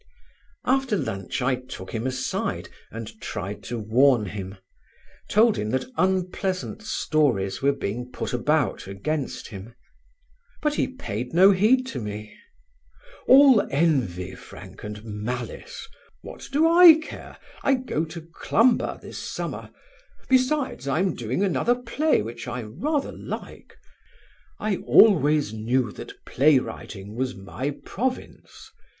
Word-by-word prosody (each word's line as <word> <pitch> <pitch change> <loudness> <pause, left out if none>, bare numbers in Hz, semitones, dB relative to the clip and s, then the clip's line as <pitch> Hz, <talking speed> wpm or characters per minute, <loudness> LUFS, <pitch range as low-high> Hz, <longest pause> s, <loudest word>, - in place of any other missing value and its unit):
'" - - -34
After 265 -6 -1
lunch 95 - -3
I 130 +1 +2
took 125 -7 -7
him 115 +2 -2
aside 130 0 -3 0.2
and 110 -1 -9
tried 100 -1 -5
to 120 +4 -4
warn 115 +2 +3
him, 95 0 -6 0.7
told 220 +1 +4
him 105 - -2
that 130 +3 -1
unpleasant 185 +1 -1
stories 145 - 0
were 140 +1 +4
being 125 -1 -4
put 125 - -4
about 140 -1 0
against 130 +9 -4
him; 110 +2 -10 0.8
but 300 -1 0
he - - 0
paid 125 - -6
no 190 +3 +8
heed 220 +7 +3
to - - -4
me. 105 -1 -7 0.9
"All 265 -4 +8
envy, 130 - 0
Frank, - - -12
and 105 0 -7
malice. 120 - -6 0.4
What - - -10
do 300 +4 +4
I 340 -1 +9
care? 315 0 -9 0.2
I 275 - +3
go 250 - -2
to 165 +1 -8
Clumber 225 +9 +1
this - - -8
summer; - - -5 0.6
besides 260 - +1
I 135 - +1
am 185 0 +1
doing 120 - -2
another 215 +5 +2
play 250 - 0
which 115 +3 -7
I 120 0 -4
rather 275 - -2
like. - - -8 0.8
I 210 -3 -1
always 150 - +4
knew 115 +2 0
that - - -11
play 145 +2 +4
writing 100 -5 -6
was 130 +1 -2
my 105 +8 -4 0.2
province. 255 +4 -5
140 Hz, 130 wpm, -25 LUFS, -, 0.9 s, I